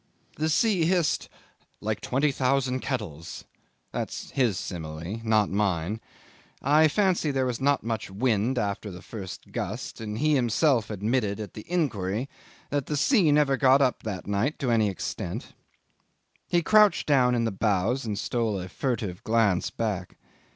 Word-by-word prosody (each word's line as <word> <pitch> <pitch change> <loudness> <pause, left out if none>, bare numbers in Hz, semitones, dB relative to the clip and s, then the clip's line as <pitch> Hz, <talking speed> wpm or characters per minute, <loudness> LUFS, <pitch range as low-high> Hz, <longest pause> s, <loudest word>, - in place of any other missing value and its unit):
The 155 +1 0
sea 185 0 +3
hissed 175 -2 +1 0.5
"like 110 0 -2
twenty 140 +3 +1
thousand 130 -1 +1
kettles." 100 - -5 0.5
That's - - -5
his 120 -9 +1
simile, 85 +5 -5
not 110 -3 +2
mine. 100 0 0 0.6
I 150 +3 +5
fancy 185 -2 +1
there 135 -2 +1
was 125 -1 -2
not 140 +1 +2
much 115 -2 -3
wind 110 +4 0
after 105 -1 -2
the 90 0 -10
first 95 -5 -8
gust; - - -5
and 105 -1 -4
he 155 +5 +2
himself 125 -1 +2
had 105 -3 -6
admitted 110 -3 0
at 105 -4 -6
the 105 - -10
inquiry 120 - -1 0.4
that 145 -2 -1
the 150 - -1
sea 185 - +4
never 145 -2 +3
got 135 0 +5
up 130 -3 +1
that 100 -4 -5
night 105 +9 0
to 130 -4 -1
any 110 -3 +3
extent. 95 - -5 0.9
He 175 -1 +2
crouched 210 +1 +5
down 125 -4 +4
in 115 - +1
the 115 - 0
bows 105 +5 0
and 105 -3 -3
stole 110 -2 -1
a 90 0 -6
furtive 110 -7 -3
glance 110 -5 +2
back. 100 -6 -3
115 Hz, 160 wpm, -27 LUFS, 100-140 Hz, 0.9 s, I